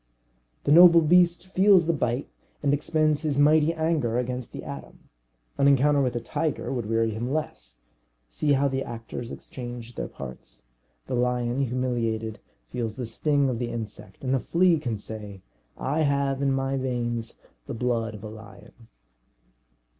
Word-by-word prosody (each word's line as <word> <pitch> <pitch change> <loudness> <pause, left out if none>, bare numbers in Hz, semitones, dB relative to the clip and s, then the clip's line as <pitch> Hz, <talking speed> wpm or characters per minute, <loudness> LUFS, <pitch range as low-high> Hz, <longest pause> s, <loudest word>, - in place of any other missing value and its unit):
The - - +1
noble 170 +1 +9
beast 175 +2 +4
feels 190 -1 +5
the 170 - +2
bite, 125 -3 -1 0.4
and 140 -1 +3
expends 155 0 +1
his 150 -4 -1
mighty 150 +2 +5
anger 160 -8 0
against 125 0 -3
the - - -7
atom. 70 -2 -10 0.5
An 140 - +5
encounter 140 +1 +4
with 125 -2 0
a - - 0
tiger 140 +5 -2
would 120 -5 -3
weary 115 0 +1
him 115 +4 -3
less; 140 - -4 0.5
see 145 - +1
how 140 +1 +3
the 135 0 -1
actors 115 0 -7
exchange 120 -2 -8
their - - -4
parts. 65 -2 -10 0.4
The - - -5
lion, 125 +1 0
humiliated, 115 -3 -2 0.3
feels 110 - -3
the 125 - -4
sting 140 +5 +1
of 125 -3 -2
the 120 -1 -2
insect; 115 +1 -7
and 130 0 0
the 135 - +2
flea 170 +3 +3
can 115 -6 -3
say, 105 -2 -7 0.3
"I 145 +4 -1
have 140 -2 +1
in 140 -1 +2
my 135 0 0
veins 120 -3 -3 0.3
the - - -4
blood 115 -2 -1
of 105 - -11
a - - -5
lion." 110 +1 -14
125 Hz, 160 wpm, -26 LUFS, 115-145 Hz, 0.5 s, noble